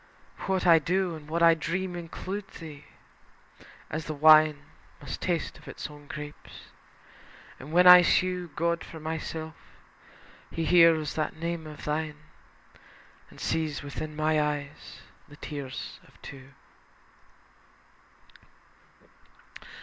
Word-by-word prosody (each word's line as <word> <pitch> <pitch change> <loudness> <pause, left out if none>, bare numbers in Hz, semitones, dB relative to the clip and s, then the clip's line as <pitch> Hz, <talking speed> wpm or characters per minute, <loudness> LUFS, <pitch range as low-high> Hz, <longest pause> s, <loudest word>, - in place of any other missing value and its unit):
What 190 -1 0
I 165 -2 +7
do 180 +2 -1
And 155 -1 -12
what 170 +1 0
I 165 0 +8
dream 180 +3 -3
include 185 +4 -6
thee, 155 -4 -10 1.1
as 155 0 -4
the 155 - -4
wine 155 0 +6 0.4
Must - - -7
taste - - -2
of - - -18
its - - -7
own 145 -1 -14
grapes. 150 0 -10 0.9
And 140 +4 -10
when 180 +2 +5
I 180 0 +11
sue 180 0 +1
God 170 +1 0
for 160 - -10
myself, 160 0 -5 1.0
He 165 - -3
hears 165 -3 +5
that 155 - -2
name 165 -1 -4
of 150 -1 -10
thine, 150 0 -2 1.1
And - - -16
sees 155 -3 -2
within 150 +2 -6
my 155 0 +2
eyes 145 -1 -5 0.3
the 145 - -14
tears 140 -4 -7
of - - -23
two. 135 -1 -11
160 Hz, 120 wpm, -28 LUFS, 150-170 Hz, 1.1 s, I